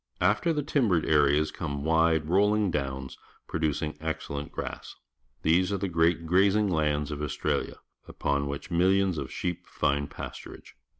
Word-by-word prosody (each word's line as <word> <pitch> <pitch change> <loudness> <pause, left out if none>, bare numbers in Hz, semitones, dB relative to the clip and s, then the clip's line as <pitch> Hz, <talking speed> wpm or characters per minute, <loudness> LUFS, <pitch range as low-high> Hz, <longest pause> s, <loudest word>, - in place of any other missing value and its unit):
After 170 - +2
the 150 -2 -1
timbered 115 - +1
areas 75 0 +3
come 70 -4 -4
wide, 80 -1 +2
roll 100 +5 +3
ing 105 -3 +1
downs, 65 -3 -4 0.3
producing 75 -1 -2
excellent 75 -2 -4
grass. - - -6 0.5
These 90 +4 +3
are 100 - 0
the 95 - -2
great 85 -1 +2
grazing 100 +4 +3
lands 75 -3 0
of 75 0 -4
Australia, 75 - -2 0.3
upon 70 0 -1
which 70 +5 -6
millions 95 0 +2
of - - -6
sheep 90 -1 -4
find 70 +1 0
pastur - - -8
age. - - -18
80 Hz, 155 wpm, -28 LUFS, 75-95 Hz, 0.5 s, areas